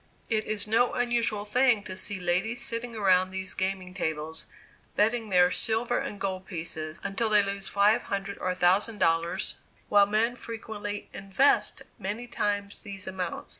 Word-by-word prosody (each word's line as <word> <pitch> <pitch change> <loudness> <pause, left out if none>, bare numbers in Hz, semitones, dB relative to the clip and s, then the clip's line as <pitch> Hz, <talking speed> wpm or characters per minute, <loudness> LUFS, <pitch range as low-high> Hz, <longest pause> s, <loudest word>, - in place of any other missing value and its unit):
It 215 -1 +1
is 215 -1 -1
no 225 +3 +3
unusual 235 -4 +1
thing 245 0 +3
to 185 - -6
see 200 0 -2
ladies 185 +7 0
sitting 235 0 -3
around 185 -3 +4
these 190 0 -3
gaming 190 -1 -2
tables, 160 -3 -3 0.5
betting 225 +1 +2
their 180 -1 +5
silver 230 +4 0
and 205 - -5
gold 190 -1 -3
pieces, 160 -2 -4
until 220 +3 0
they 210 -1 +5
lose 200 0 -3
five 205 +3 +4
hundred 200 0 -4
or 185 - -1
a 180 - 0
thousand 190 +5 +3
dollars, 165 -1 +1 0.3
while 205 -1 +6
men 220 +4 +2
frequently 215 -3 -6
"invest" 195 +9 +2 0.2
many 210 +5 -3
times 205 -3 -2
these 200 -3 -7
amounts. 185 -2 -4
200 Hz, 160 wpm, -28 LUFS, 185-220 Hz, 0.5 s, while